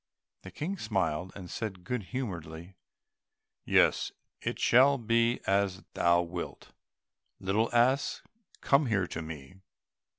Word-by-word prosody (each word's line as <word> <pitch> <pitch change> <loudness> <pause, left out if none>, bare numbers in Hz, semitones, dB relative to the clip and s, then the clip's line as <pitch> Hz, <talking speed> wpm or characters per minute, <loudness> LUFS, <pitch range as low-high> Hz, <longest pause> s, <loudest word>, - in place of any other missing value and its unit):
The 95 - -10
King 170 - -4
smiled, 95 -5 -1
and 95 -3 -8
said 95 -1 -5
good 110 +2 -3
humouredly, 85 -8 -6 0.9
"Yes, - - +3 0.3
it - - -3
shall 135 +3 +5
be 115 0 +2
as 95 -1 +1
thou 85 0 +3
wilt, 85 0 -7 0.7
little 105 +4 +1
ass, 125 +4 +2 0.4
come 140 0 +3
here 100 -5 +1
to 85 - -5
me." 80 +1 -9
95 Hz, 120 wpm, -30 LUFS, 85-120 Hz, 0.9 s, shall